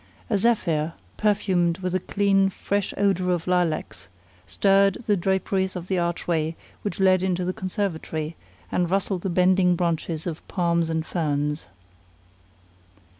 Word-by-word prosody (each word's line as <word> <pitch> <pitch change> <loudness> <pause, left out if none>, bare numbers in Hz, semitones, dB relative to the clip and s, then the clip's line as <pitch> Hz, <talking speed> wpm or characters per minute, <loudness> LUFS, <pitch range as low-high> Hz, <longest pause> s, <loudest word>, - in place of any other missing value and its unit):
A 210 - +3
zephyr, 170 -8 +1 0.2
perfumed 185 -5 +1
with 185 -1 -3
the 185 - +2
clean, 195 0 +2
fresh 200 +1 -2
odor 195 -2 +1
of 175 -2 -1
lilacs, 180 -3 -1 0.4
stirred 195 -1 +3
the 205 - +3
draperies 190 +1 0
of 180 0 -6
the 190 -2 +1
archway 170 -2 -1 0.3
which 205 - -4
led 185 -1 +4
into 180 -1 0
the 185 - -1
conservatory 170 -5 -3 0.4
and 175 -2 +1
rustled 195 -1 0
the 190 - -2
bending 180 0 +3
branches 165 -2 -1
of 165 -3 -5
palms 170 -2 +1
and 160 -1 -1
ferns. 150 -3 -1
180 Hz, 135 wpm, -24 LUFS, 170-195 Hz, 0.4 s, led